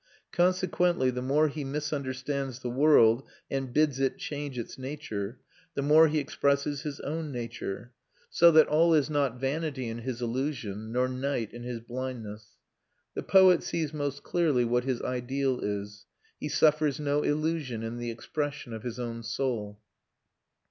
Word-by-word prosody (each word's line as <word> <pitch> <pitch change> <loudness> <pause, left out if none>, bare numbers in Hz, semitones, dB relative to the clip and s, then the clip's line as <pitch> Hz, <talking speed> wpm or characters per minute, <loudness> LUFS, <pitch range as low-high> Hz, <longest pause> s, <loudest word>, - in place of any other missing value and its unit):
Consequently 180 -5 +2
the 125 0 -4
more 145 +4 +3
he 150 0 -4
misunderstands 140 -2 -3
the 125 - -3
world 125 -4 +5 0.3
and 135 -2 -2
bids 145 -1 +2
it 135 -1 +1
change 145 -3 -5
its 120 - -5
nature, 130 -6 -5 0.4
the 140 - -1
more 155 +3 +7
he 155 0 0
expresses 140 0 0
his 150 -3 -5
own 155 +1 -3
nature: 120 -2 -5 0.4
so 170 - +6
that 155 -1 +7
all 165 +2 +4
is 150 0 +2
not 140 -4 0
vanity 135 -1 -2
in 115 +1 -5
his 120 0 -4
illusion, 115 -4 -3
nor 125 +2 +2
night 130 -3 -2
in 120 - -8
his 120 -1 -5
blindness. 115 -4 -7 0.6
The - - -3
poet 185 -3 +6
sees 160 -3 -2
most 145 -2 -3
clearly 150 -8 +2
what 120 +1 +1
his 130 -3 -1
ideal 130 +1 -1
is; 100 0 -4 0.3
he - - -4
suffers 155 -1 +3
no 145 0 +1
illusion 150 -7 -1
in 115 +1 -4
the 120 0 -3
expression 145 +2 -4
of 110 - -6
his 120 +1 -5
own 115 -1 -4
soul. 110 -3 -3
135 Hz, 155 wpm, -29 LUFS, 120-150 Hz, 0.6 s, more